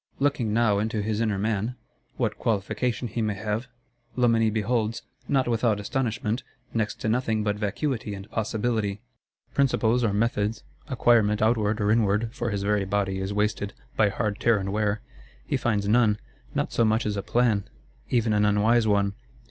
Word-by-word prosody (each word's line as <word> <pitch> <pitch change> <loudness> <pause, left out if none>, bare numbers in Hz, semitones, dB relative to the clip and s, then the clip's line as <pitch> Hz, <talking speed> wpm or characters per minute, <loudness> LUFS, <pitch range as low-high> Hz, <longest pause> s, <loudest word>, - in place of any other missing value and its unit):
Looking 135 -6 +1
now 110 -2 +3
into 110 0 -1
his 110 +1 -1
inner 110 -3 +1
man, 110 +3 -1 0.4
what - - -1
qualification 110 +3 -1
he 115 +2 -3
may 105 -2 0
have, 110 +4 -3 0.5
Loménie 115 -3 +3
beholds, 110 +1 -1 0.2
not 135 -3 +2
without 115 -2 +1
astonishment, 115 +1 -1 0.3
next 110 -2 0
to - - -1
nothing 110 -2 +1
but 105 -1 0
vacuity 105 +1 -2
and 95 +1 -9
possibility. 110 -2 -1 0.5
Principles 125 -3 +2
or 110 - +2
methods, 105 0 0 0.2
acquirement 115 -6 +3
outward 110 -1 +2
or 105 0 +2
inward 110 +1 +2
(for 120 -2 -2
his 100 -2 -2
very 105 0 +1
body 95 0 -1
is 95 +1 -3
wasted, 105 0 -1 0.2
by 105 -2 +4
hard 105 0 -2
tear 115 -2 +3
and 95 0 -3
wear) 105 0 0 0.4
he - - -1
finds 105 -4 0
none; 110 -1 +4 0.4
not - - -1
so 115 - +3
much 110 +1 +2
as 105 -1 -1
a 100 - -1
plan, 110 -2 +1 0.4
even 115 -3 +2
an 105 0 +3
unwise 110 +3 +3
one. 100 -1 +2
110 Hz, 165 wpm, -26 LUFS, 105-115 Hz, 0.5 s, by